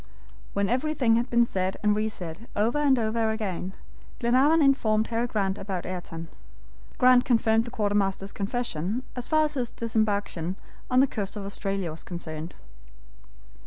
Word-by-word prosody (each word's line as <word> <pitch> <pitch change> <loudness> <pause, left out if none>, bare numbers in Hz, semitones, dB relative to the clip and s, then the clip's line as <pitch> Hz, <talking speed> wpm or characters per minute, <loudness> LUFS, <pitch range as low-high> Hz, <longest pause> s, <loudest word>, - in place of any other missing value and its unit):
When 200 0 +1
everything 255 -1 +2
had 240 +2 -1
been 235 0 +4
said 190 -3 -2
and 210 0 +4
re 215 +1 0
said 180 +2 -8
over 225 +7 +1
and 280 -3 +4
over 225 0 +1
again, 195 -4 -3 0.4
Glenarvan 265 +6 +4
informed 220 -6 +3
Harry 235 +1 0
Grant 200 -4 -1
about 190 -3 -4
Ayrton. 170 -2 -6 0.7
Grant 250 0 +6
confirmed 225 -2 +3
the - - -6
quartermaster's 200 -3 0
confession 205 0 -2
as 250 -1 -5
far 310 -1 +4
as 300 - -3
his 250 -4 -2
disembarkation 205 -6 -1 0.3
on 255 +1 +5
the - - +6
coast 205 -5 -4
of 205 -2 -5
Australia 195 -3 -3
was 160 - -9
concerned. 160 -1 -6
220 Hz, 155 wpm, -27 LUFS, 195-245 Hz, 0.7 s, Grant